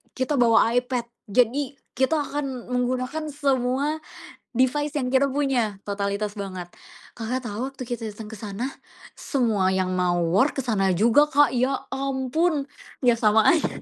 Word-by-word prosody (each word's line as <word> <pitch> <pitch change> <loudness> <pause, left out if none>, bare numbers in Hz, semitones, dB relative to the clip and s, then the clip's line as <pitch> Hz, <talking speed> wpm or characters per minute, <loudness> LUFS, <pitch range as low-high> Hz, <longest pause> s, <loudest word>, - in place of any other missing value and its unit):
kita 260 +3 0
bawa 230 -1 +5
iPad 245 -1 0 0.2
jadi 255 +5 +1 0.2
kita 265 +5 +1
akan 270 -4 -5
menggunakan 255 +5 -1
semua, 280 +1 0 0.5
device 280 +4 +1
yang 255 -3 0
kita 270 +1 +3
punya 250 -8 0
totalitas 200 +1 -2
banget, 185 -3 -6 0.5
Kakak, 240 +3 -2
tau 230 +4 -3
waktu 270 -1 -8
kita 240 -2 -3
datang 215 0 -9
ke 220 - -8
sana 210 +5 -4 0.5
semua 225 -9 +1
yang 185 -1 0
mau 175 -1 +1
war 205 - +3
ke 270 - -1
sana 195 -5 +2
juga 235 +9 +5
Kak, 290 +1 +5
ya 255 +3 +2 0.2
ampun 275 +3 0 0.4
ya 245 -2 +5
sama 220 +3 +4
aja. 335 -3 0
250 Hz, 150 wpm, -24 LUFS, 215-275 Hz, 0.5 s, bawa